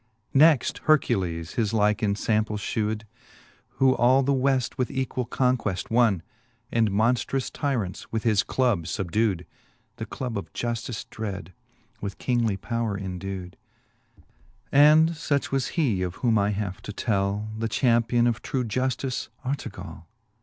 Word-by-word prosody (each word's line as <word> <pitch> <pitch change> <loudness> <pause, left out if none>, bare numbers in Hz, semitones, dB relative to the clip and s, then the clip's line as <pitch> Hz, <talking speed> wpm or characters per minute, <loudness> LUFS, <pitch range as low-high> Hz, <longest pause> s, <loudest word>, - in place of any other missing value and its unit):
Next 150 -1 +5
Hercules 95 - +2
his 115 -4 0
like 105 -1 +3
enlample 105 0 0
fhewed, 105 +1 -2 0.7
Who 130 -1 +4
all 130 +3 +4
the 140 +2 +2
Weft 130 -1 +1
with 125 -2 -1
equall 130 -2 -2
conqueft 125 -9 0
wonne, 115 -7 +3 0.5
And 115 -2 +2
monftrous 120 +5 +1
tyrants 120 - -2
with 110 -1 -2
his 110 -4 +3
club 120 -10 0
fubdewed; 95 +1 -1 0.5
The - - -5
club 120 -5 -4
of 80 -4 -10
Juftice 120 -1 -3
dreadj 100 -5 -5 0.5
with 100 -1 -5
kingly 115 -5 0
powre 115 -1 -2
endewed, 95 -1 -5 0.6
III. - - -23 0.5
And 150 +3 +7
fuch 150 -3 -1
was 135 -2 0
he, 120 - +2
of 90 0 -2
whoin 115 -3 +3
I 100 0 +2
have 100 -1 -3
to 105 - -7
tell, 100 0 -1
The 110 +1 -2
champion 120 0 +2
of 120 -1 0
true 130 -3 -2
Juftice, 130 +3 -2 0.2
Artegall. 130 -9 -5
115 Hz, 140 wpm, -26 LUFS, 100-130 Hz, 0.7 s, And